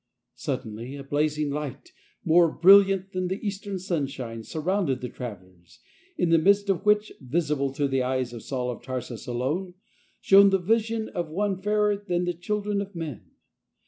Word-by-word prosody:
Suddenly 115 Hz, +5 st, -5 dB
a 140 Hz, -, -7 dB
blazing 150 Hz, +1 st, 0 dB
light, 145 Hz, -2 st, -5 dB, 0.3 s
more 170 Hz, 0 st, +5 dB
brilliant 195 Hz, +2 st, +5 dB
than 185 Hz, 0 st, -2 dB
the 190 Hz, +3 st, -3 dB
eastern 200 Hz, -1 st, -3 dB
sunshine, 135 Hz, -10 st, -3 dB
surrounded 160 Hz, -, -1 dB
the 125 Hz, -1 st, -5 dB
travel 100 Hz, -7 st, -8 dB
lers, 85 Hz, -2 st, -23 dB, 0.4 s
in 175 Hz, -2 st, +1 dB
the 165 Hz, -, +6 dB
midst 200 Hz, +4 st, +3 dB
of 190 Hz, -, -2 dB
which 210 Hz, 0 st, +3 dB
— -, -, -31 dB
visible 140 Hz, 0 st, -1 dB
to 140 Hz, +1 st, 0 dB
the 135 Hz, -1 st, 0 dB
eyes 130 Hz, -1 st, -1 dB
of 115 Hz, -, -7 dB
Saul 125 Hz, -2 st, -3 dB
of 120 Hz, -, -8 dB
Tarsus 125 Hz, -3 st, -6 dB
alone 150 Hz, +10 st, -2 dB, 0.2 s
— -, -, -37 dB
shone 200 Hz, +1 st, +7 dB
the 195 Hz, -, +3 dB
vision 225 Hz, +3 st, 0 dB
of 170 Hz, -2 st, -4 dB
One 195 Hz, +4 st, -1 dB
fairer 210 Hz, 0 st, +2 dB
than 180 Hz, -3 st, -2 dB
the 175 Hz, -, -1 dB
children 205 Hz, +3 st, -2 dB
of 200 Hz, -1 st, -8 dB
men. 155 Hz, -9 st, -6 dB
165 Hz, 175 wpm, -26 LUFS, 130-195 Hz, 0.4 s, shone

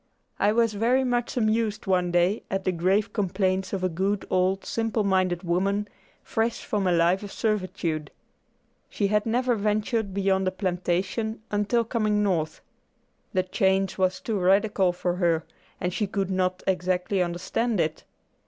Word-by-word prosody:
I 205 Hz, -, +4 dB
was 230 Hz, 0 st, +2 dB
very 240 Hz, +5 st, +2 dB
much 245 Hz, -1 st, -1 dB
amused 220 Hz, -2 st, 0 dB
one 180 Hz, -2 st, +2 dB
day 175 Hz, +4 st, +2 dB
at 195 Hz, 0 st, -2 dB
the 185 Hz, -, +1 dB
grave 190 Hz, +5 st, +1 dB
complaints 190 Hz, -2 st, 0 dB
of 190 Hz, -2 st, -3 dB
a -, -, +3 dB
good 190 Hz, +4 st, -1 dB
old, 185 Hz, +1 st, +1 dB
simple 225 Hz, -1 st, -1 dB
minded 185 Hz, -2 st, +1 dB
woman, 195 Hz, +4 st, 0 dB, 0.4 s
fresh 225 Hz, +1 st, -1 dB
from 205 Hz, -3 st, 0 dB
a -, -, +3 dB
life 175 Hz, +2 st, +3 dB
of 205 Hz, -1 st, -7 dB
servitude. 185 Hz, -7 st, -2 dB, 0.8 s
She 200 Hz, -2 st, -1 dB
had 210 Hz, +1 st, +1 dB
never 245 Hz, +2 st, +2 dB
ventured 215 Hz, 0 st, 0 dB
beyond 190 Hz, -1 st, +1 dB
a -, -, +2 dB
plantation 190 Hz, +4 st, -2 dB
until 210 Hz, +3 st, +1 dB
coming 215 Hz, -2 st, 0 dB
North. 165 Hz, -6 st, -1 dB, 0.7 s
The 185 Hz, -1 st, +2 dB
change 190 Hz, +1 st, +1 dB
was 185 Hz, 0 st, +1 dB
too 215 Hz, -3 st, -2 dB
radical 195 Hz, 0 st, +3 dB
for 175 Hz, 0 st, -2 dB
her, 170 Hz, -3 st, +2 dB, 0.4 s
and 180 Hz, -1 st, -2 dB
she 210 Hz, +2 st, -1 dB
could 195 Hz, -1 st, -2 dB
not 185 Hz, 0 st, 0 dB
exactly 185 Hz, +1 st, 0 dB
understand 185 Hz, +6 st, -1 dB
it. 155 Hz, -1 st, -1 dB
195 Hz, 155 wpm, -26 LUFS, 185-215 Hz, 0.8 s, I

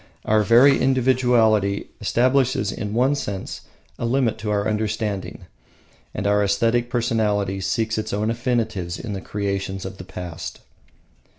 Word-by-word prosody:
Our 110 Hz, 0 st, +3 dB
very 120 Hz, +6 st, +5 dB
individuality 120 Hz, -6 st, +2 dB
establishes 125 Hz, -1 st, +2 dB
in 105 Hz, +1 st, -4 dB
one 130 Hz, +4 st, +3 dB
sense 100 Hz, -9 st, -4 dB, 0.4 s
a -, -, -2 dB
limit 125 Hz, -2 st, +1 dB
to 105 Hz, -, -4 dB
our 100 Hz, 0 st, 0 dB
understanding; 105 Hz, -2 st, -3 dB, 0.7 s
and -, -, -3 dB
our 105 Hz, 0 st, +3 dB
aesthetic 115 Hz, +4 st, +1 dB
personality 105 Hz, -5 st, 0 dB
seeks 110 Hz, +4 st, -1 dB
its 110 Hz, 0 st, -4 dB
own 105 Hz, +2 st, 0 dB
affinities 115 Hz, -7 st, -2 dB
in 115 Hz, -4 st, -5 dB
the 95 Hz, -, -5 dB
creations 95 Hz, -1 st, -3 dB
of 95 Hz, 0 st, -7 dB
the -, -, -6 dB
past. 90 Hz, -2 st, -7 dB
110 Hz, 135 wpm, -22 LUFS, 100-120 Hz, 0.7 s, very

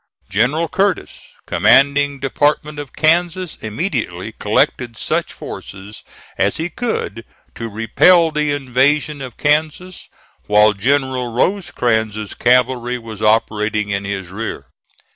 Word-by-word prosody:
General 130 Hz, -, +1 dB
Curtis, 195 Hz, +3 st, -1 dB, 0.2 s
commanding 140 Hz, +1 st, +3 dB
Department 145 Hz, +2 st, 0 dB
of 145 Hz, -3 st, -7 dB
Kansas, 175 Hz, +3 st, +1 dB
immediately 120 Hz, -, -3 dB
collected 115 Hz, -2 st, 0 dB
such -, -, -1 dB
forces 100 Hz, +2 st, -9 dB, 0.4 s
as 100 Hz, +1 st, +1 dB
he 165 Hz, +2 st, -2 dB
could 115 Hz, -, -3 dB, 0.3 s
to 115 Hz, -1 st, -6 dB
repel 160 Hz, -, +4 dB
the 150 Hz, 0 st, 0 dB
invasion 145 Hz, +2 st, +1 dB
of 130 Hz, -3 st, -8 dB
Kansas, 155 Hz, +5 st, -1 dB, 0.4 s
while 105 Hz, +1 st, +5 dB
General 130 Hz, +2 st, 0 dB
Rosecrans's 110 Hz, -, -1 dB
cavalry 125 Hz, 0 st, +2 dB
was 110 Hz, -3 st, -9 dB
operating 105 Hz, -1 st, +1 dB
in 100 Hz, 0 st, -2 dB
his 95 Hz, -3 st, -4 dB
rear. 110 Hz, +5 st, -6 dB
125 Hz, 110 wpm, -18 LUFS, 110-150 Hz, 0.4 s, while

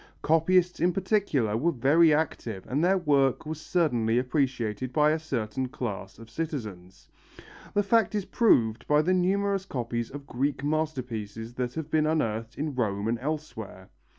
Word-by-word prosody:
Copyists 175 Hz, +3 st, +3 dB
in 175 Hz, +2 st, +2 dB
particular 180 Hz, -, +1 dB
were 160 Hz, +9 st, +1 dB
very 155 Hz, +5 st, +4 dB
active 130 Hz, -10 st, -1 dB
and 145 Hz, +5 st, 0 dB
their 190 Hz, +2 st, +4 dB
work 140 Hz, -7 st, +2 dB
was 155 Hz, 0 st, -5 dB
certainly 120 Hz, -11 st, +1 dB
appreciated 125 Hz, -3 st, -1 dB
by 150 Hz, +3 st, +3 dB
a 160 Hz, -, 0 dB
certain 130 Hz, -4 st, -3 dB
class 105 Hz, -8 st, -5 dB
of 115 Hz, 0 st, -12 dB
citizens. 110 Hz, -, -6 dB, 0.7 s
The 205 Hz, -, +3 dB
fact 215 Hz, 0 st, +2 dB
is 205 Hz, -3 st, -1 dB
proved 115 Hz, -, +2 dB
by 150 Hz, +1 st, +4 dB
the 185 Hz, +4 st, +2 dB
numerous 195 Hz, +2 st, +1 dB
copies 120 Hz, -4 st, -3 dB
of 140 Hz, 0 st, -9 dB
Greek 140 Hz, +2 st, -2 dB
masterpieces 125 Hz, -8 st, -3 dB
that 125 Hz, 0 st, -3 dB
have 160 Hz, -1 st, -5 dB
been 155 Hz, -1 st, +2 dB
unearthed 115 Hz, -7 st, -1 dB
in 150 Hz, 0 st, -2 dB
Rome 105 Hz, -5 st, -1 dB
and 115 Hz, +1 st, 0 dB
elsewhere. 130 Hz, -10 st, -6 dB
140 Hz, 155 wpm, -27 LUFS, 115-160 Hz, 0.7 s, very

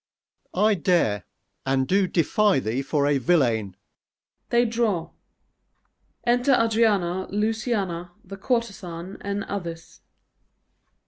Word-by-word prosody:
_ -, -, -2 dB
I 215 Hz, +1 st, +5 dB
dare, 165 Hz, -, +1 dB, 0.4 s
and 135 Hz, -1 st, +1 dB
do 195 Hz, 0 st, +2 dB
defy 190 Hz, +4 st, +2 dB
thee 125 Hz, +1 st, -1 dB
for 140 Hz, +1 st, 0 dB
a 145 Hz, -1 st, +2 dB
villain. 120 Hz, -, +1 dB, 0.7 s
[They 240 Hz, 0 st, +3 dB
draw. 225 Hz, -7 st, -1 dB, 1.1 s
_Enter 245 Hz, +2 st, +3 dB
ADRIANA, 205 Hz, -5 st, +1 dB
LUCIANA, 210 Hz, -4 st, -1 dB, 0.2 s
the 195 Hz, +2 st, -9 dB
Courtezan, 195 Hz, -6 st, -3 dB
and 200 Hz, 0 st, -3 dB
others. 170 Hz, -5 st, -7 dB
190 Hz, 105 wpm, -24 LUFS, 165-215 Hz, 1.1 s, I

